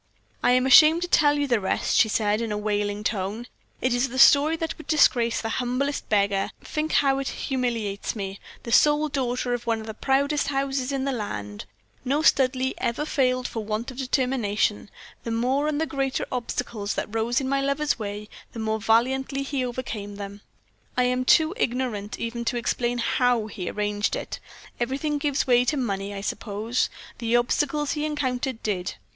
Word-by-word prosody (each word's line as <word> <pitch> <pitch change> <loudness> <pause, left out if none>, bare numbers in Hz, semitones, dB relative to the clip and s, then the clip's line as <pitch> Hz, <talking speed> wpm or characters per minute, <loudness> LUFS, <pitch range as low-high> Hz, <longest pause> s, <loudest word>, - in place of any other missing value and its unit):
"I 245 - +4
am 255 0 +3
ashamed 310 +6 +7
to - - -2
tell 295 -4 +4
you 290 - +1
the 240 -5 +2
rest," 190 - 0
she 220 - +5
said, 210 0 +1
in 230 -2 -3
a 210 - -1
wailing 205 0 -1
tone. 205 +2 -2 0.4
"It 255 -1 +1
is 245 +2 +1
a 260 - -6
story 290 +4 +6
that 325 0 -3
would 315 - -11
disgrace 240 -7 +3
the 225 - -3
humblest 255 +4 -2
beggar 200 -2 +2
think 310 +1 -3
how 275 -1 +3
it 275 - -3
humiliates 235 -6 -2
me, 195 -2 -5 0.2
the 235 - -6
sole 300 +4 +4
daughter 250 -3 -1
of 240 0 -4
one 225 -1 +1
of 220 - -8
the 220 - -6
proudest 280 +5 +1
houses 275 -1 -1
in 270 -1 -1
the 275 - 0
land. 105 - -5 0.4
No 280 +4 0
Studleigh 260 -2 +3
ever 240 +6 -1
failed 255 -4 +1
for 225 - -5
want 215 +4 -3
of 250 - -12
determination. 250 -6 0 0.3
The - - -5
more 255 +6 +1
and 300 -1 -1
the 320 - +1
greater 270 -3 -2
the - - -4
obstacles 235 -4 -3
that 210 - -4
rose 225 +1 +1
in 265 - -3
my 275 +1 +1
lover's 280 0 0
way, 210 0 -5 0.3
the - - -9
more 220 0 -1
valiantly 265 +5 +1
he 275 -1 -2
overcame 230 -5 -5
them. 200 0 -8 0.6
I 250 - +4
am 250 0 0
too 315 +5 +4
ignorant 235 -5 -2
even 235 +1 -3
to 245 - 0
explain 240 +1 -1
how 240 -1 +1
he 195 -4 -5
arranged 205 0 -1
it - - -5 0.4
everything 280 +5 -1
gives 285 -1 0
way 245 -2 +4
to 290 +4 0
money, 200 -5 -2
I 200 -1 -5
suppose 215 +3 -2 0.3
the 230 0 0
obstacles 290 +4 +1
he 300 -2 -2
encountered 260 -5 -2
did. 190 -4 -2
245 Hz, 185 wpm, -25 LUFS, 215-275 Hz, 0.6 s, ashamed